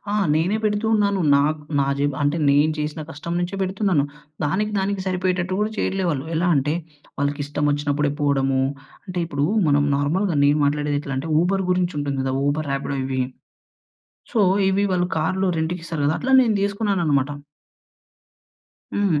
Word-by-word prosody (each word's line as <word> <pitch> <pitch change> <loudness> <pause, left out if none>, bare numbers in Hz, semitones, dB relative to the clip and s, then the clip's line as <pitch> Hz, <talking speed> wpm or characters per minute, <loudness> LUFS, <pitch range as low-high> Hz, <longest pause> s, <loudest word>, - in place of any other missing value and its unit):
ఆ! - - +1 0.2
నేనే 175 +7 +1
పెడుతూ 210 +1 0
ఉన్నాను. 200 -2 +2 0.2
నాకు 150 +2 +1 0.2
నా 135 - +1
జేబు 145 0 0
అంటే, 145 +3 +1
నేను 145 +2 +4
చేసిన 150 +1 -3
కష్టం 170 +3 -6
నుంచే 175 +3 -3
పెడుతున్నాను. 190 -5 +1 0.4
దానికి 210 +8 0
దానికి 195 0 -1
సరిపోయేటట్టు 185 0 0
గూడా 215 +1 0
చెయ్యట్లే 190 -1 -1
వాళ్ళు. 140 -1 -2
ఎలా 175 +2 +1
అంటే, 145 +3 +1 0.4
వాళ్ళకిష్టమొచ్చినప్పుడే 145 0 0
పోడము 135 -2 +2 0.5
అంటే, 180 -1 -4
ఇప్పుడూ 145 -2 -1 0.2
మనం 145 0 +3
నార్మల్‌గా 165 +4 0
నేను 145 +1 +4
మాట్లాడేదెట్లంటే, 145 -1 -1
ఊబర్ 190 +2 +1
గురించుంటుంది 150 -7 0
గదా! 130 0 -1
ఊబర్, 145 0 -1
రాపిడో 140 0 -2
ఇవి. 130 -1 -1 1.1
సో, 230 - +2 0.3
ఇవి 200 +1 +2
వాళ్ళు 175 0 +1
కార్‌లు 185 +5 0
రెంట్‌కిస్తారు 165 -2 -3
గదా! 155 - +1
అట్లా 265 +1 +2
నేను 225 -4 +1
తీసుకున్నాననమాట. 185 -9 +1 1.6
హ్మ్. 190 -8 +2
155 Hz, 140 wpm, -22 LUFS, 145-190 Hz, 1.6 s, నేను